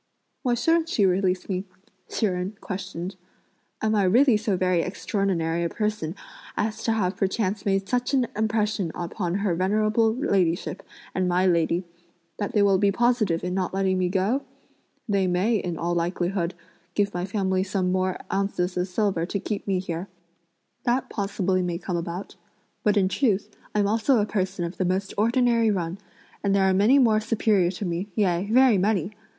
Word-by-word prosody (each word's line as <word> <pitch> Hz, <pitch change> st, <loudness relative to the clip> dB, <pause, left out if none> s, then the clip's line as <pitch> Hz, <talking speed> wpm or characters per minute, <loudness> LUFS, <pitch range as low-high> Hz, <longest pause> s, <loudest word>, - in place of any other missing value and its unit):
"Why 245 Hz, -3 st, +1 dB
shouldn't 325 Hz, +6 st, +2 dB
she 205 Hz, -, +2 dB
release 185 Hz, 0 st, +1 dB
me?" 185 Hz, -1 st, -2 dB, 0.5 s
Hsi 225 Hz, -, 0 dB
Jen 185 Hz, 0 st, -1 dB
questioned. 185 Hz, -1 st, -5 dB, 0.7 s
"Am 215 Hz, 0 st, +2 dB
I 210 Hz, -, +3 dB
really 240 Hz, +6 st, +5 dB
so 210 Hz, -3 st, 0 dB
very 185 Hz, -2 st, +2 dB
extraordinary 180 Hz, -3 st, -1 dB
a 170 Hz, -, 0 dB
person 210 Hz, -6 st, -2 dB, 0.4 s
as 215 Hz, +1 st, -1 dB
to 225 Hz, -, +2 dB
have 195 Hz, -4 st, 0 dB
perchance 195 Hz, 0 st, -1 dB
made 195 Hz, 0 st, +1 dB
such 250 Hz, +2 st, 0 dB
an 255 Hz, -2 st, +3 dB
impression 215 Hz, -4 st, 0 dB
upon 175 Hz, +1 st, -3 dB
her 185 Hz, -, +2 dB
venerable 215 Hz, +5 st, +2 dB
ladyship 185 Hz, -, 0 dB, 0.3 s
and 185 Hz, -1 st, 0 dB
my 180 Hz, +1 st, +2 dB
lady 170 Hz, 0 st, +2 dB, 0.6 s
that 205 Hz, +3 st, -2 dB
they 210 Hz, -3 st, +4 dB
will 195 Hz, -2 st, +4 dB
be 200 Hz, 0 st, +3 dB
positive 220 Hz, -6 st, +1 dB
in 180 Hz, 0 st, -2 dB
not 185 Hz, 0 st, -1 dB
letting 190 Hz, -1 st, +1 dB
me 180 Hz, -1 st, +1 dB
go? 200 Hz, +8 st, +1 dB, 0.7 s
They 200 Hz, -3 st, +2 dB
may, 190 Hz, +6 st, +2 dB
in 175 Hz, -4 st, -3 dB
all 170 Hz, +2 st, -1 dB
likelihood, 175 Hz, +1 st, -1 dB, 0.4 s
give 205 Hz, -1 st, +1 dB
my 175 Hz, 0 st, -2 dB
family 190 Hz, -1 st, 0 dB
some 185 Hz, -1 st, -1 dB
more 185 Hz, 0 st, 0 dB, 0.2 s
ounces 190 Hz, -2 st, -1 dB
of 180 Hz, +1 st, 0 dB
silver 185 Hz, -3 st, 0 dB
to 200 Hz, -, -2 dB
keep 205 Hz, +1 st, -4 dB
me 195 Hz, -2 st, +1 dB
here; 180 Hz, 0 st, -4 dB, 0.8 s
that 245 Hz, +2 st, 0 dB
possibly 195 Hz, -2 st, 0 dB
may 175 Hz, -1 st, -2 dB
come 180 Hz, 0 st, -4 dB
about. 170 Hz, +3 st, -5 dB, 0.5 s
But, 210 Hz, 0 st, +3 dB
in 190 Hz, -2 st, +4 dB
truth, 210 Hz, -2 st, 0 dB, 0.2 s
I'm 205 Hz, -1 st, +3 dB
also 225 Hz, +5 st, +3 dB
a 205 Hz, -, +2 dB
person 190 Hz, -4 st, -2 dB
of 170 Hz, -, -6 dB
the -, -, 0 dB
most 190 Hz, +2 st, -1 dB
ordinary 235 Hz, +1 st, +3 dB
run, 180 Hz, -2 st, -2 dB, 0.4 s
and 200 Hz, -1 st, +2 dB
there 190 Hz, -1 st, +3 dB
are 190 Hz, -, +3 dB
many 210 Hz, +8 st, +5 dB
more 225 Hz, -5 st, +4 dB
superior 215 Hz, -4 st, +2 dB
to 195 Hz, +2 st, -5 dB
me, 175 Hz, +3 st, -3 dB
yea 190 Hz, -1 st, +1 dB
very 250 Hz, -4 st, +5 dB
many! 195 Hz, -1 st, +1 dB
195 Hz, 175 wpm, -25 LUFS, 180-215 Hz, 0.8 s, really